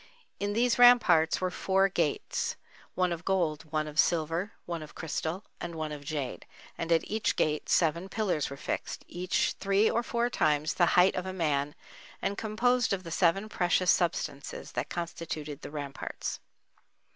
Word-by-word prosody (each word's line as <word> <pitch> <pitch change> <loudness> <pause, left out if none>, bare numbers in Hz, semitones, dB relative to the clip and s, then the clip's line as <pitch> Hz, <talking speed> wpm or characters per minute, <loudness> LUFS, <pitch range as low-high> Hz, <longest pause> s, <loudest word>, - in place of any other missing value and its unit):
In 205 0 -1
these 240 +2 +2
ramparts 205 -10 +6
were 185 -1 -1
four 195 +1 +2
gates—one 180 +1 -2
of 170 0 -4
gold, 165 -5 -1
one 155 -1 0
of 150 0 -4
silver, 165 +4 +1
one 170 -2 -4
of 155 - -11
crystal 165 +4 -3 0.2
and 170 -1 -5
one 155 -1 -3
of 145 -1 -7
jade—and 150 +3 -6
at 165 -1 +4
each 220 +1 -1
gate 150 -1 0
seven 170 +3 +2
pillars 195 -10 -1
were 140 - -7
fixed, - - -4
each 180 +1 0
three 200 +2 +3
or 235 - +1
four 235 0 0
times 150 -4 +1
the 175 - +3
height 180 +2 +6
of 180 0 -3
a 185 - -4
man 150 -5 0 0.4
and 200 - -1
composed 230 +3 +1
of 190 -1 -2
the 165 - -8
seven 190 +5 +2
precious 180 -2 +2
substances 145 -5 -2
that - - -3
constituted 160 -3 -5
the - - -7
ramparts. 145 -2 -5
170 Hz, 160 wpm, -29 LUFS, 155-195 Hz, 0.4 s, ramparts